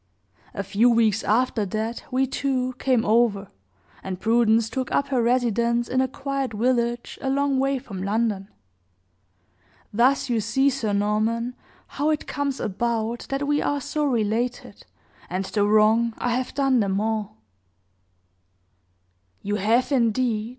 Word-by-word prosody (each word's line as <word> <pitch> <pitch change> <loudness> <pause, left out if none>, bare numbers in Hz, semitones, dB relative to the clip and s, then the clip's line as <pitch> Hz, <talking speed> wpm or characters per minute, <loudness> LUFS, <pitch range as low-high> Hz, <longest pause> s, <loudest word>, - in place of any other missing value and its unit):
A 200 - -2
few 205 +5 +3
weeks 225 -2 +2
after 230 0 +1
that 220 +4 -4
we, 260 +1 +1
too, 260 -1 -1
came 255 -4 +1
over, 210 -3 +2 0.5
and 185 -1 -5
Prudence 225 +1 +3
took 260 +3 -4
up 280 - 0
her 260 -3 +1
residence 235 -1 +1
in 255 +1 +1
a 260 - +1
quiet 275 -1 -3
village 240 +1 -1
a 270 - -2
long 275 0 +1
way 275 +1 +1
from 200 -7 -8
London. 205 -1 -1 1.4
Thus 265 +5 +3
you 235 -3 0
see, 265 +6 +2
Sir 235 -5 -2
Norman, 215 +4 0 0.3
how 295 +2 -2
it 305 -1 -1
comes 280 -2 -3
about 230 +2 -2
that 275 +1 -1
we 290 0 +1
are 285 - 0
so 300 +2 -3
related, 240 -1 -2 0.4
and 185 +2 -2
the 205 +1 0
wrong 220 +2 +3
I 245 - -1
have 255 +1 -3
done 270 -3 +2
them 195 -2 0
all." 215 - -2 2.1
"You 205 +1 -1
have, 225 +7 +1
indeed!" 230 -3 +1
235 Hz, 145 wpm, -24 LUFS, 215-260 Hz, 2.1 s, few